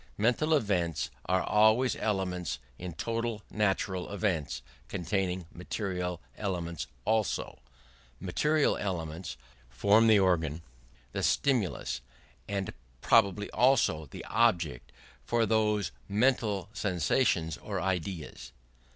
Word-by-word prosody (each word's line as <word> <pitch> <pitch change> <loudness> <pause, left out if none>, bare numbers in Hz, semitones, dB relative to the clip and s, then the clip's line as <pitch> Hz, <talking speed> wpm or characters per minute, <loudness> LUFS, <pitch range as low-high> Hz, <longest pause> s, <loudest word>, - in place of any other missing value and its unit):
Mental 125 +9 +3
events 90 - 0 0.2
are 95 +1 +2
always 110 +4 +4
elements 90 -5 -1 0.2
in 90 -1 -5
total 115 +4 -2
natural 95 -3 0
events 95 -8 -1 0.2
containing 90 0 -1
material 90 -1 -3 0.2
elements 85 -8 -3 0.2
also: 110 -1 0 0.6
material 150 - +2
elements 85 -3 -4 0.3
form 100 - +4
the 110 -2 +7
organ, 85 -4 +1 0.5
the - - -3
stimulus, 115 - +1 0.5
and 100 -1 -2 0.3
probably 105 -3 +4
also 120 - +3
the - - -9
object 90 - +1 0.3
for 120 -1 +2
those 105 -3 +1 0.2
mental 105 -3 +2
sensations 85 - +1
or 100 -3 -4
ideas. 90 -8 -3
95 Hz, 100 wpm, -30 LUFS, 90-110 Hz, 0.6 s, the